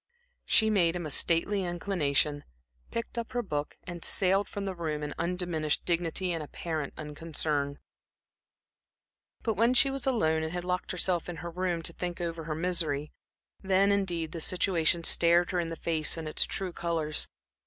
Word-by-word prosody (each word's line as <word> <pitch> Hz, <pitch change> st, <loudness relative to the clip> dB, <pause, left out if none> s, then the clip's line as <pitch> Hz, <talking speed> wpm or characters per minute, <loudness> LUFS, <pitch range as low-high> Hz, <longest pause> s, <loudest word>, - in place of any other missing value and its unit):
She 220 Hz, -1 st, +4 dB
made 175 Hz, -5 st, +3 dB
him 175 Hz, -2 st, -3 dB
a 155 Hz, -, -3 dB
stately 180 Hz, +7 st, +3 dB
inclination, 155 Hz, -5 st, 0 dB, 0.5 s
picked 230 Hz, +1 st, -3 dB
up 235 Hz, +2 st, -6 dB
her 245 Hz, 0 st, 0 dB
book 150 Hz, -7 st, -3 dB
and 175 Hz, -2 st, -7 dB
sailed 195 Hz, +1 st, +3 dB
from 200 Hz, -1 st, -4 dB
the 190 Hz, -, -2 dB
room 155 Hz, -4 st, -3 dB
in 150 Hz, -, -3 dB
undiminished 170 Hz, -3 st, -1 dB
dignity 175 Hz, +1 st, 0 dB
and 165 Hz, -2 st, -2 dB
apparent 155 Hz, -1 st, -4 dB
unconcern. 150 Hz, -2 st, -2 dB, 1.7 s
But 225 Hz, -, +1 dB
when 230 Hz, +5 st, +3 dB
she 270 Hz, +2 st, +6 dB
was 270 Hz, -1 st, -2 dB
alone 160 Hz, -11 st, +2 dB
and 160 Hz, 0 st, -3 dB
had 175 Hz, 0 st, -3 dB
locked 180 Hz, 0 st, -2 dB
herself 180 Hz, -1 st, +1 dB
into 175 Hz, -1 st, -6 dB
her 170 Hz, -, -5 dB
room 175 Hz, -1 st, -1 dB
to 170 Hz, -, 0 dB
think 175 Hz, 0 st, -4 dB
over 165 Hz, -2 st, -3 dB
her 155 Hz, -1 st, -3 dB
misery, 160 Hz, -4 st, 0 dB, 0.5 s
then, 195 Hz, +1 st, +3 dB
indeed, 175 Hz, -5 st, 0 dB
the 165 Hz, -, -5 dB
situation 170 Hz, -2 st, +1 dB
stared 170 Hz, +1 st, +4 dB
her 180 Hz, -, 0 dB
in 170 Hz, -1 st, -1 dB
the 165 Hz, -, -4 dB
face 160 Hz, -1 st, 0 dB
in 160 Hz, -1 st, -4 dB
its 155 Hz, -, +3 dB
true 185 Hz, -2 st, -3 dB
colors. 165 Hz, -3 st, 0 dB
170 Hz, 175 wpm, -29 LUFS, 160-185 Hz, 1.7 s, she